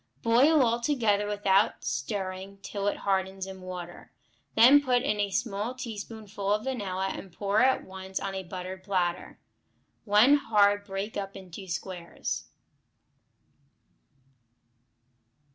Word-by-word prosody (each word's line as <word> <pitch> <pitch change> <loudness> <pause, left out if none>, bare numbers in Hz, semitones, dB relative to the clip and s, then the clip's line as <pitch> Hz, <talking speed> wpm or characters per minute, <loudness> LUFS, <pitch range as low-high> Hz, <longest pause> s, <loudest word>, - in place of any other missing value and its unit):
Boil 265 +6 +5
all 235 0 +2
together 225 -7 +1
without 205 -1 +2
stirring 185 - -4
till 200 -1 -3
it 205 - 0
hardens 190 -1 0
in 190 -1 -9
water; 180 -1 -8 0.4
then 255 +6 +8
put 250 -3 +2
in 210 -6 0
a 205 -1 +1
small 220 +2 -2
teaspoonful 215 -4 -5
of 210 +1 +1
vanilla 195 -7 -2
and 190 - -9
pour 200 +4 +1
at 260 +1 +3
once 190 0 -6
on 195 - -4
a 190 - -3
buttered 185 +1 -7
platter. 180 -3 -1 0.6
When 220 +7 +6
hard 205 -5 +3
break 195 +2 -4
up 195 -1 -4
into 190 0 -9
squares. 175 0 -4
200 Hz, 125 wpm, -28 LUFS, 190-220 Hz, 0.6 s, then